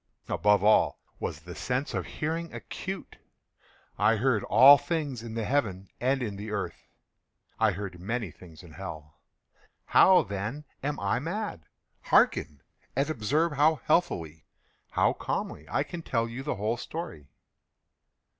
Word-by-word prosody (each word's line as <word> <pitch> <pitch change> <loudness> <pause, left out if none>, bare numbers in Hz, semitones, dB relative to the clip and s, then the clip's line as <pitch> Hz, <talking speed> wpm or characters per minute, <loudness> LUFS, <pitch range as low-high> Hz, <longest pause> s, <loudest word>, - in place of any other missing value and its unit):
Above 105 -1 +3
all 105 +1 +4 0.2
was 75 - -4
the 90 +2 -9
sense 130 - -2
of - - -2
hearing 165 +2 -3
acute. 190 +1 -6 0.8
I 110 - +4
heard 115 -1 +1
all 140 +2 +8
things 145 -5 -2
in 115 -1 -7
the 115 -2 -2
heaven 100 -8 -1
and 130 +1 +1
in 105 -4 -4
the 105 +2 -6
earth. 105 -2 -4 0.7
I 110 -2 +3
heard 95 -1 -6
many 110 0 -3
things 80 -1 -14
in 85 - -13
hell. 75 -3 -9 0.7
How, 185 -1 +6
then, 105 +9 -5 0.2
am 145 +1 -2
I 100 +4 0
mad? 165 - -4 0.4
Hearken! 75 -3 +3 0.3
and 140 +4 +1
observe 150 +7 +1
how 150 +2 +4
healthily—how 85 - -1
calmly - - -4
I - - +1
can 175 - -7
tell 115 -7 -1
you 115 +3 -6
the 145 - -2
whole 110 +4 -1
story. 120 - -7
115 Hz, 140 wpm, -28 LUFS, 100-145 Hz, 0.8 s, all